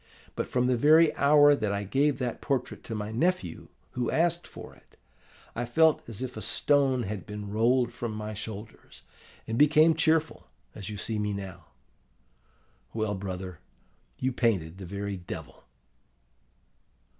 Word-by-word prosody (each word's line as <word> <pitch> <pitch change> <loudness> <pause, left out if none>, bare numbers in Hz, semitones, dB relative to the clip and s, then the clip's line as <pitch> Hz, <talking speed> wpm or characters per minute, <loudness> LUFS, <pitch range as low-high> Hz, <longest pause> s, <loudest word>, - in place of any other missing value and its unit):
But - - -2
from 125 0 0
the 125 0 +2
very 155 +6 +5
hour 145 0 +6
that 110 -7 -1
I 100 0 -2
gave 135 +6 +1
that 125 -3 -3
portrait 135 -3 -2
to 115 - -5
my 105 0 -4
nephew, 120 - -1 0.2
who 125 -1 -2
asked 170 +1 +1
for - - -11
it, - - -24 0.6
I 120 - -2
felt 160 +6 +3
as 115 +2 -5
if 125 - -5
a 110 - -6
stone 135 -2 +2
had 105 -2 -5
been 105 -1 -6
rolled 120 +3 +2
from 120 -1 -4
my 105 0 -5
shoulders, 105 +1 -9 0.4
and 115 +1 -2
became 155 +2 +6
cheerful, 160 - +1 0.3
as 100 +1 -7
you 105 - -6
see 110 +2 -2
me 105 0 -1
now. 95 -2 -8 1.3
Well, 110 -2 -1
brother, 95 -3 -6 0.6
you 130 - -1
painted 95 -8 0
the 95 - -8
very 100 +1 -4
Devil! 90 - -9
115 Hz, 155 wpm, -28 LUFS, 100-140 Hz, 1.3 s, hour